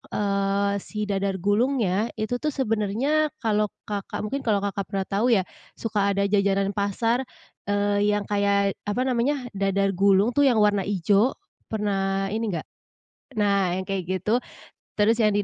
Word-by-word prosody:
eee, 200 Hz, 0 st, +1 dB
si 210 Hz, -1 st, -5 dB
dadar 195 Hz, -1 st, 0 dB
gulungnya 215 Hz, -1 st, +1 dB
itu 220 Hz, +3 st, -1 dB
tuh 305 Hz, 0 st, 0 dB
sebenarnya 255 Hz, +6 st, +1 dB, 0.2 s
kalau 210 Hz, -1 st, +2 dB, 0.2 s
Kakak, 200 Hz, -1 st, -4 dB
mungkin 275 Hz, +6 st, -2 dB
kalau 210 Hz, -3 st, +2 dB
Kakak 200 Hz, -1 st, -2 dB
pernah 195 Hz, -2 st, -1 dB
tahu 205 Hz, +5 st, +1 dB
ya. 190 Hz, -3 st, +3 dB, 0.3 s
Suka 205 Hz, -3 st, 0 dB
ada 200 Hz, -, +1 dB
jajanan 200 Hz, -1 st, +2 dB
pasar, 230 Hz, +5 st, 0 dB, 0.4 s
eee, 205 Hz, 0 st, +2 dB
yang 205 Hz, -, -1 dB
kayak 200 Hz, -1 st, +1 dB
apa 245 Hz, +5 st, 0 dB
namanya, 255 Hz, +1 st, 0 dB
dadar 195 Hz, 0 st, +1 dB
gulung 200 Hz, +3 st, +4 dB
tuh 285 Hz, -, +4 dB
yang 235 Hz, -4 st, +3 dB
warna 205 Hz, -2 st, +3 dB
ijo, 205 Hz, +5 st, +2 dB, 0.4 s
pernah 195 Hz, -2 st, -1 dB
ini 225 Hz, +1 st, -1 dB
enggak 160 Hz, -, -4 dB, 0.7 s
nah, 200 Hz, -4 st, +2 dB
yang 190 Hz, -, -2 dB
kayak 195 Hz, -2 st, -2 dB
gitu. 190 Hz, +6 st, 0 dB, 0.6 s
Terus 220 Hz, +2 st, +3 dB
yang 210 Hz, -2 st, +3 dB
di 205 Hz, -, +2 dB
205 Hz, 155 wpm, -25 LUFS, 195-220 Hz, 0.7 s, gulung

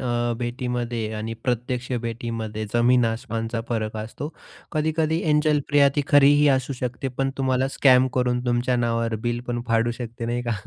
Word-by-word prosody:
अ, 120 Hz, -1 st, 0 dB
भेटीमध्ये 120 Hz, -2 st, -3 dB
आणि 110 Hz, +1 st, -4 dB
प्रत्यक्ष 125 Hz, 0 st, -2 dB
भेटीमध्ये 115 Hz, -2 st, -4 dB
जमीन 120 Hz, +1 st, +4 dB
आसमानचा 115 Hz, 0 st, -2 dB
फरक 110 Hz, -2 st, -2 dB
असतो. 110 Hz, +7 st, -5 dB, 0.4 s
कधी-कधी 160 Hz, +1 st, 0 dB
एंजेल 150 Hz, -1 st, +2 dB
प्रिया 145 Hz, -1 st, +5 dB
ती 145 Hz, -, +2 dB
खरीही 145 Hz, +1 st, +6 dB
असू 135 Hz, 0 st, +1 dB
शकते, 125 Hz, +2 st, -3 dB
पण 135 Hz, +1 st, -2 dB
तुम्हाला 130 Hz, 0 st, +1 dB
स्कॅमकरून 125 Hz, -2 st, +3 dB
तुमच्या 125 Hz, +1 st, +1 dB
नावावर 115 Hz, -1 st, 0 dB
बिल 120 Hz, 0 st, -1 dB
पण 120 Hz, 0 st, -1 dB
फाडू 115 Hz, +1 st, +2 dB
शकते 115 Hz, -1 st, -5 dB
नाही 120 Hz, +1 st, -1 dB
का. 120 Hz, -1 st, -1 dB
120 Hz, 150 wpm, -24 LUFS, 115-135 Hz, 0.4 s, खरीही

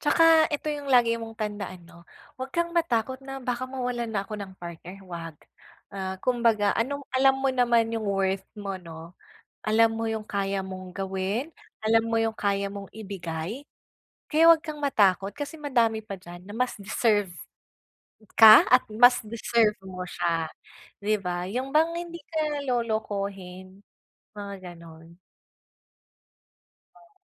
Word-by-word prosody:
tsaka 325 Hz, +1 st, +5 dB
ito 295 Hz, 0 st, -4 dB
'yung 290 Hz, -1 st, -6 dB
lagi 235 Hz, -3 st, +4 dB
mong 225 Hz, 0 st, -8 dB
tandaan 205 Hz, -5 st, -5 dB
'no, 170 Hz, 0 st, -17 dB, 0.3 s
huwag 260 Hz, -, -3 dB
kang 340 Hz, 0 st, -1 dB
matakot 260 Hz, -6 st, 0 dB
na 270 Hz, 0 st, -7 dB
baka 250 Hz, +1 st, -2 dB
mawalan 250 Hz, -2 st, -3 dB
na 205 Hz, -3 st, -2 dB
ako 210 Hz, +1 st, -7 dB
ng 195 Hz, -1 st, -7 dB
partner, 175 Hz, +2 st, -9 dB
huwag. 165 Hz, -3 st, -7 dB, 0.6 s
Ah, 190 Hz, -1 st, -4 dB
kumbaga 230 Hz, -4 st, +2 dB
anong 280 Hz, +4 st, -2 dB
alam 270 Hz, +1 st, +4 dB
mo 270 Hz, 0 st, +1 dB
naman 235 Hz, -2 st, +2 dB
'yung 220 Hz, -2 st, -2 dB
worth 195 Hz, -1 st, 0 dB
mo 195 Hz, -2 st, -5 dB
'no, 165 Hz, 0 st, -11 dB, 0.5 s
alam 225 Hz, +1 st, +4 dB
mo 225 Hz, 0 st, -2 dB
'yung 220 Hz, -1 st, -3 dB
kaya 195 Hz, -2 st, -2 dB
mong 185 Hz, -1 st, -8 dB
gawin, 195 Hz, +9 st, -2 dB, 0.3 s
alam 225 Hz, +1 st, +4 dB
mo 230 Hz, -, 0 dB
'yung 225 Hz, -1 st, +1 dB
kaya 200 Hz, -1 st, -1 dB
mong 200 Hz, -1 st, -8 dB
ibigay. 195 Hz, -, -6 dB, 0.6 s
Kaya 320 Hz, +2 st, +5 dB
huwag 325 Hz, -1 st, +5 dB
kang 310 Hz, -2 st, -6 dB
matakot, 200 Hz, -7 st, +2 dB
kasi 290 Hz, +2 st, -5 dB
madami 235 Hz, -6 st, +1 dB
pa 200 Hz, -2 st, -6 dB
diyan 175 Hz, 0 st, -11 dB
na 205 Hz, -, -8 dB
mas 250 Hz, 0 st, 0 dB
deserve 205 Hz, -1 st, +1 dB, 1.1 s
ka 220 Hz, -1 st, +10 dB
at 250 Hz, 0 st, +6 dB
mas 245 Hz, +3 st, +6 dB
deserve 225 Hz, -1 st, +1 dB
mo 185 Hz, -1 st, -7 dB
siya, 165 Hz, -2 st, -1 dB, 0.5 s
di 215 Hz, +1 st, +1 dB
ba, 180 Hz, -1 st, -3 dB
'yung 255 Hz, +6 st, -3 dB
bang 325 Hz, +2 st, +4 dB
hindi 340 Hz, 0 st, -5 dB
ka 305 Hz, -3 st, -2 dB
lolokohin 200 Hz, -5 st, -3 dB, 0.6 s
mga 200 Hz, -1 st, -6 dB, 0.2 s
gano'n. 165 Hz, +1 st, -15 dB, 1.8 s
Oh. 345 Hz, +3 st, -23 dB
220 Hz, 145 wpm, -26 LUFS, 190-255 Hz, 1.8 s, ka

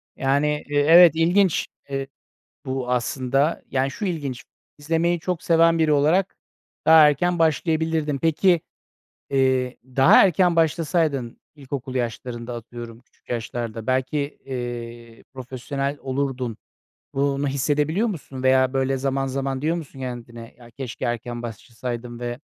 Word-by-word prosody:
Yani, 145 Hz, +2 st, +1 dB
eee, 145 Hz, 0 st, +2 dB
evet, 170 Hz, -1 st, +8 dB
ilginç, 175 Hz, +2 st, +2 dB, 0.2 s
eee, 135 Hz, 0 st, -3 dB, 0.6 s
bu 130 Hz, -1 st, -3 dB
aslında. 135 Hz, +4 st, 0 dB
Yani 135 Hz, +1 st, 0 dB
şu 210 Hz, +7 st, -5 dB
ilginç, 145 Hz, -9 st, -3 dB, 0.3 s
izlemeyi 165 Hz, +3 st, 0 dB
çok 180 Hz, 0 st, -3 dB
seven 165 Hz, 0 st, +4 dB
biri 155 Hz, -1 st, +3 dB
olarak 160 Hz, +7 st, +2 dB, 0.5 s
daha 160 Hz, -1 st, +8 dB
erken 175 Hz, +3 st, 0 dB
başlayabilirdin. 160 Hz, -2 st, +1 dB
Peki, 165 Hz, +3 st, +2 dB, 0.7 s
eee, 130 Hz, -2 st, +1 dB
daha 135 Hz, +1 st, +6 dB
erken 175 Hz, -1 st, +2 dB
başlasaydın, 155 Hz, -5 st, 0 dB
ilkokul 135 Hz, -2 st, -6 dB
yaşlarında, 120 Hz, 0 st, -4 dB
atıyorum, 115 Hz, 0 st, -9 dB
küçük 125 Hz, -, -36 dB
yaşlarda, 115 Hz, -1 st, -4 dB
belki, 130 Hz, +3 st, 0 dB, 0.3 s
eee, 120 Hz, -2 st, -7 dB
profesyonel 135 Hz, +2 st, -4 dB
olurdun. 130 Hz, -3 st, -3 dB, 0.6 s
Bunu 140 Hz, +1 st, 0 dB
hissedebiliyor 150 Hz, -, 0 dB
musun 140 Hz, -9 st, -6 dB
veya 130 Hz, 0 st, +4 dB
böyle 135 Hz, 0 st, +1 dB
zaman 135 Hz, 0 st, -1 dB
zaman 135 Hz, 0 st, -3 dB
diyor 160 Hz, +3 st, +1 dB
musun 140 Hz, -4 st, -9 dB
kendine, 120 Hz, -2 st, -7 dB
"Ya 120 Hz, -1 st, -15 dB
keşke 125 Hz, -2 st, -6 dB
erken 120 Hz, 0 st, -3 dB
başlasaydım 120 Hz, +1 st, -6 dB
ve 120 Hz, 0 st, -4 dB
135 Hz, 125 wpm, -23 LUFS, 125-155 Hz, 0.7 s, evet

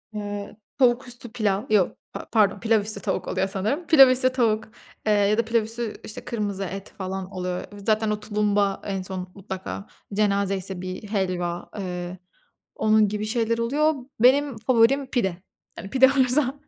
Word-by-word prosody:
Eee, 205 Hz, -1 st, -5 dB, 0.2 s
tavuk 255 Hz, -1 st, +3 dB
üstü 240 Hz, -1 st, -10 dB
pilav. 210 Hz, -4 st, 0 dB
Yok, 205 Hz, -4 st, +2 dB, 0.2 s
pa -, -, -6 dB
pardon, 205 Hz, -3 st, +3 dB
pilav 225 Hz, -1 st, +2 dB
üstü 210 Hz, 0 st, -4 dB
tavuk -, -, -2 dB
oluyor 190 Hz, +1 st, 0 dB
sanırım. 215 Hz, -, -2 dB
Pilav 275 Hz, -6 st, +8 dB
üstü 255 Hz, 0 st, +3 dB
tavuk, 225 Hz, -4 st, +1 dB, 0.4 s
eee, 215 Hz, -, +2 dB
ya 205 Hz, +1 st, +3 dB
da 230 Hz, -, +2 dB
pilav 230 Hz, 0 st, +2 dB
üstü, 225 Hz, 0 st, -4 dB
işte, 215 Hz, -, -8 dB
kırmızı 205 Hz, -4 st, -3 dB
et 195 Hz, +1 st, -7 dB
falan 190 Hz, 0 st, -5 dB
oluyor. 180 Hz, -1 st, -3 dB
V 205 Hz, -, -10 dB
zaten 215 Hz, +1 st, +1 dB
o 210 Hz, -, -1 dB
tulumba 205 Hz, -2 st, 0 dB
en 195 Hz, -1 st, -2 dB
son 185 Hz, -1 st, -6 dB
mutlaka 195 Hz, 0 st, -6 dB, 0.3 s
cenazeyse 195 Hz, -2 st, 0 dB
bir 185 Hz, +2 st, -6 dB
helva, 180 Hz, -4 st, -2 dB
eee, 180 Hz, -1 st, -5 dB, 0.6 s
onun 215 Hz, -1 st, +3 dB
gibi 210 Hz, +1 st, -3 dB
şeyler 230 Hz, +1 st, 0 dB
oluyor. 290 Hz, +7 st, +2 dB, 0.3 s
Benim 270 Hz, +2 st, +4 dB
favorim 240 Hz, +4 st, +3 dB
pide. 220 Hz, -9 st, -1 dB, 0.4 s
Yani, 195 Hz, -, -7 dB
pide 265 Hz, 0 st, +6 dB
olursa 265 Hz, 0 st, +2 dB
210 Hz, 165 wpm, -24 LUFS, 195-235 Hz, 0.6 s, Pilav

